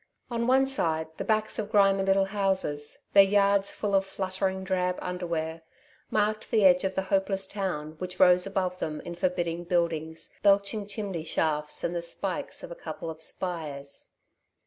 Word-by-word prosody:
On 235 0 -1
one 265 +1 +5
side 160 - 0
the - - -3
backs 215 0 +1
of 210 -1 -3
grimy 195 -2 +4
little 195 0 +3
houses, 190 -7 -1 0.2
their 200 - +9
yards 200 0 +3
full 205 -1 -3
of 195 0 +4
fluttering 190 0 -3
drab 180 -1 0
underwear, 170 -3 -3 0.5
marked 215 0 0
the 215 -3 +3
edge 180 -1 +6
of 190 -1 -1
the 190 - 0
hopeless 195 0 +1
town 165 -6 -4
which 180 0 -6
rose 180 0 +6
above 185 -2 -2
them 155 -1 -3
in 175 - -7
forbidding 175 -1 -1
buildings, 165 -2 -1
belching 200 +1 +2
chimney 200 -5 -4
shafts 150 -2 0
and 170 - -1
the 170 - -2
spikes 170 - -3
of - - -8
a - - -6
couple 165 - -6
of 160 0 -11
spires. 155 -6 -5
190 Hz, 170 wpm, -28 LUFS, 170-200 Hz, 0.5 s, their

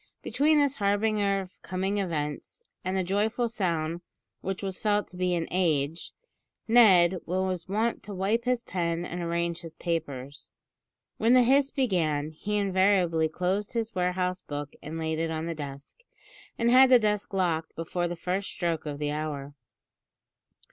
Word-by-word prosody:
Between 305 +2 +3
this 285 -2 +2
harbinger 205 -1 +1
of 185 -1 -13
coming 190 +2 -2
events, 155 - -4 0.2
and 185 +1 -1
the 190 - +1
joyful 215 +6 0
sound 170 -6 -1 0.4
which 195 +1 -4
was 190 -1 -4
felt 210 -1 +1
to - - -13
be 180 0 0
"an 165 -1 -2
age," 160 -3 0 0.6
Ned 190 -6 +6
was 185 0 -1
wont 220 +4 0
to 205 - -8
wipe 210 +6 0
his 250 -1 +1
pen 170 -3 -2
and 175 0 -5
arrange 170 0 -1
his 165 -1 -10
papers. 145 -5 -4 0.7
When 230 +3 +3
the 250 - +7
hiss 275 +3 +4
began, 165 - 0
he 210 +7 -3
invariably 185 -5 +2
closed 185 +7 -1
his 230 -1 -2
warehouse 180 0 -1
book 145 0 -6
and 155 +2 -6
laid 160 -1 -2
it 165 0 0
in 160 0 -3
the 170 - -2
desk, 140 -2 -8 0.6
and 235 +1 +2
had 260 +1 +8
the 255 - +8
desk 210 -3 0
locked 170 -5 -1
before 175 +2 -2
the 175 - -4
first 185 +3 -2
stroke 165 -3 -2
of 145 -1 -4
the 145 0 -2
hour. 145 -2 -4
180 Hz, 160 wpm, -28 LUFS, 165-205 Hz, 0.7 s, had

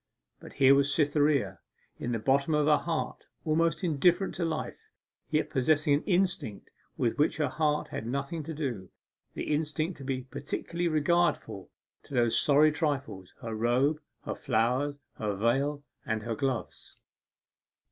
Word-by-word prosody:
But - - -12
here 135 0 +6
was 140 0 +3
Cytherea, 145 - +2 0.4
in 120 - -3
the 115 - 0
bottom 140 +7 +2
of 150 -1 +2
her 150 0 +5
heart 165 -2 -3 0.2
almost 160 +1 +1
indifferent 175 +4 +2
to 175 - -2
life, 160 -1 -4 0.4
yet 155 0 0
possessing 145 +2 +2
an 145 - +1
instinct 180 - 0 0.3
with 120 +3 0
which 150 - +2
her 150 -3 +1
heart 150 +1 0
had 110 - -5
nothing 140 +6 -3
to 160 - -5
do, 120 - -4 0.5
the - - -2
instinct 155 +2 -2
to - - -8
be 130 -1 -2
particularly 145 +6 -4
regardful 170 +2 +1 0.4
of - - -20
those 120 -4 +2
sorry 150 +2 +5
trifles, 140 - -3
her 115 -1 -5
robe, 125 +7 +1 0.2
her - - -2
flowers, 125 +6 0 0.2
her 105 -2 -1
veil, 135 +7 0 0.2
and 110 -5 -2
her 115 0 -2
gloves. 130 0 -4
145 Hz, 150 wpm, -29 LUFS, 125-155 Hz, 0.5 s, here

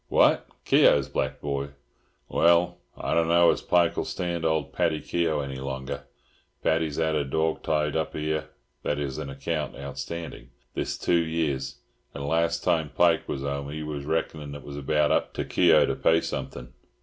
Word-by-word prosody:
"What, - - +4 0.2
Keogh's - - +5
black - - -2
boy! 70 -1 -2 0.6
Well, 85 +1 +3 0.2
I - - -2
don't 85 -1 +3
know 85 0 +6
as - - -2
Pike'll 85 -1 +2
stand 85 -2 -3
old 80 -4 0
Paddy 85 -3 +1
Keogh 80 -3 0
any 70 -1 -5
longer. 65 0 -5 0.6
Paddy's 80 -1 +1
'ad 80 -1 +1
a 75 -2 +1
dorg 80 +3 0
tied 75 -1 0
hup 80 0 -2
'ere" 80 0 -2 0.3
(i.e., 75 -1 -1
an 70 - -6
account 70 0 -3
outstanding) 80 +4 -6 0.2
"this - - -2
two 85 -1 +2
years, 70 -5 -2 0.3
and 70 0 -4
last 85 +2 +1
time 80 -3 +1
Pike 85 +3 +2
was 70 - -3
'ome 70 0 -3
'e 80 +1 -5
was 75 -2 -4
reck'nin' 75 -1 -2
it 70 - -9
was 70 +2 -8
about 75 +1 +1
hup - - 0
to - - -2
Keogh - - +5
to - - -1
pay 80 - +3
something." 60 -6 -5
75 Hz, 170 wpm, -26 LUFS, 70-80 Hz, 0.6 s, know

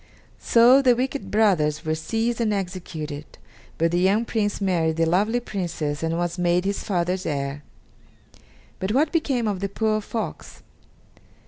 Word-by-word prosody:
So 245 +4 +6
the 250 -3 +4
wicked 265 +3 -3
brothers 175 -9 +2
were 155 - 0
seized 225 +9 -1
and 220 -2 +1
executed, 170 -6 -5 0.4
but 165 0 +1
the 175 - +1
young 200 +5 +2
Prince 210 -3 -1
married 170 -5 +1
the 165 0 +2
lovely 205 +8 +2
Princess 170 -9 -4
and 165 0 -1
was 175 +1 -2
made 175 +1 +2
his 200 0 -2
father's 180 -1 -1
heir. 140 -1 -3 1.2
But 190 +3 -1
what 295 +4 +2
became 270 -8 0
of 200 -3 -1
the 200 +1 -2
poor 215 +1 0
fox? 225 +2 -6
190 Hz, 150 wpm, -24 LUFS, 165-225 Hz, 1.2 s, So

